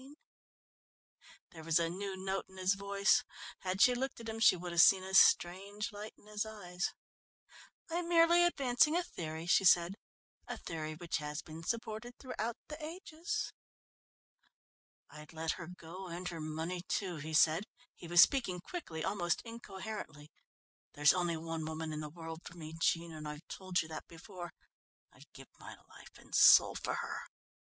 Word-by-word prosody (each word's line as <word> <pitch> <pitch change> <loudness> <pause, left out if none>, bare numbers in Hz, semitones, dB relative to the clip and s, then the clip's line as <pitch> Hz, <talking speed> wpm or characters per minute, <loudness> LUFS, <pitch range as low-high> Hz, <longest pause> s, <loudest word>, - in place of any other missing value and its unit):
There 160 -1 -11
was 165 0 +3
a 170 -1 +2
new 190 +3 -4
note 190 +1 -2
in 190 - -15
his 185 +1 +2
voice. 200 0 +2 0.4
Had 185 +1 +2
she 250 - +6
looked 265 +1 -3
at 230 - -8
him 225 0 -4
she 220 - +6
would 175 0 -6
have 170 -1 +5
seen 190 0 +7
a 190 0 -7
strange 195 +3 +4
light 210 +1 -8
in - - -22
his 210 0 -2
eyes. 195 -5 -4 1.0
"I'm 340 +1 -3
merely 340 0 +6
advancing 295 -1 +3
a 355 - +1
theory," 160 - -6
she 180 - +4
said, 175 0 +5 0.5
"a - - -5
theory 155 -1 -5
which 170 +1 -3
has 150 -1 -5
been 160 +1 -9
supported 230 +5 -4
throughout 235 -3 -4
the 305 +1 -8
ages." 340 +4 -4 1.6
"I'd 150 +1 -12
let 160 0 -1
her 170 - -6
go 180 +1 -9
and 175 +1 -5
her 165 -2 -6
money, 160 +3 -3
too," 185 -5 -2
he 155 +1 -4
said. 165 +4 +4 0.3
He 170 - -11
was 175 +1 +8
speaking 235 -10 0
quickly, 175 - -6
almost 175 -4 0
incoherently. 200 -9 -8 0.6
"There's 150 +1 +5
only 175 -2 0
one 165 0 -4
woman 160 0 -4
in 150 - -4
the 150 -1 -5
world 165 0 -8
for 170 - -11
me, 155 -1 -8
Jean, 165 0 +1
and 155 -1 -7
I've 150 +2 -8
told 185 -2 -1
you - - -10
that 155 - -7
before. 175 +1 -9 0.6
I'd - - -18
give - - -13
my - - -10
life - - -15
and - - -17
soul - - +8
for - - -3
her." - - -4
180 Hz, 170 wpm, -34 LUFS, 165-215 Hz, 1.6 s, was